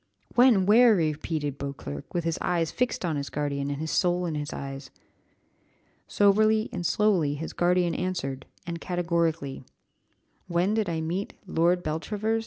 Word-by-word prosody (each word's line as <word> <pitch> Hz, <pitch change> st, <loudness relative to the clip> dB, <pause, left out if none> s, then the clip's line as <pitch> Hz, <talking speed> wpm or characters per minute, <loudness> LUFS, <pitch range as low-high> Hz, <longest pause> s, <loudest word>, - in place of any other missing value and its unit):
"When, 240 Hz, -6 st, +5 dB
where?" 225 Hz, +2 st, +6 dB
repeated 155 Hz, -3 st, -2 dB
Beauclerc, 140 Hz, -, -6 dB
with 175 Hz, -, -1 dB
his 165 Hz, -1 st, -1 dB
eyes 170 Hz, -3 st, 0 dB
fixed 250 Hz, -6 st, -1 dB
on 160 Hz, -4 st, -1 dB
his 140 Hz, 0 st, -4 dB
guardian, 140 Hz, -1 st, -2 dB
and 140 Hz, 0 st, -3 dB
his 160 Hz, 0 st, -3 dB
soul 180 Hz, -1 st, +1 dB
in 165 Hz, -, -2 dB
his 145 Hz, -1 st, -4 dB
eyes. 135 Hz, 0 st, -6 dB, 1.2 s
Soberly 215 Hz, +2 st, +3 dB
and 175 Hz, -, -3 dB
slowly 175 Hz, -6 st, +2 dB
his 160 Hz, +3 st, -6 dB
guardian 175 Hz, -1 st, +2 dB
answered, 135 Hz, -8 st, -3 dB, 0.2 s
and 170 Hz, -1 st, -5 dB
categorically, 165 Hz, -6 st, -1 dB, 0.8 s
"When 180 Hz, +3 st, +1 dB
did 215 Hz, -4 st, 0 dB
I 165 Hz, -1 st, -2 dB
meet 175 Hz, +5 st, -3 dB
Lord 175 Hz, 0 st, +2 dB
Beltravers? 210 Hz, +8 st, -1 dB
170 Hz, 150 wpm, -27 LUFS, 150-190 Hz, 1.2 s, where